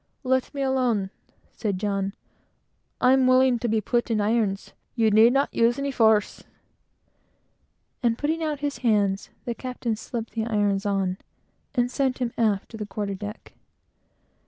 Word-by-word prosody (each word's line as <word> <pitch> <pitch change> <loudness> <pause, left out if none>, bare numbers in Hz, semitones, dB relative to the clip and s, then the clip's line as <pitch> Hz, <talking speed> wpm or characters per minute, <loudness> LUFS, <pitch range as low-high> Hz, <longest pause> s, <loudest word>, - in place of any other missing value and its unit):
"Let 260 0 +1
me 275 - -1
alone," 245 -7 0 0.4
said 205 -4 -3
John. 195 -1 -2 0.9
"I'm 260 0 +4
willing 255 -1 +4
to 240 - -2
be 220 -1 +1
put 240 +4 0
in 225 -2 +1
irons. 210 -2 0 0.2
You 225 -3 +3
need 220 +3 +6
not 275 +2 +1
use 235 +1 +3
any 280 0 -2
force;" 220 -4 +2 1.6
and 230 -2 +1
putting 315 +4 -1
out 300 -3 -2
his 290 -1 -3
hands, 205 -5 +1 0.2
the 240 - -2
captain 245 -2 -3
slipped 230 +1 -6
the 220 -1 -2
irons 205 -2 0
on, 195 -2 -1 0.6
and 245 -1 +1
sent 265 -1 0
him 245 -2 -2
aft 210 -4 0
to 225 - -8
the 210 -1 -5
quarter 200 0 -3
deck. 205 +3 -8
230 Hz, 155 wpm, -25 LUFS, 205-255 Hz, 1.6 s, need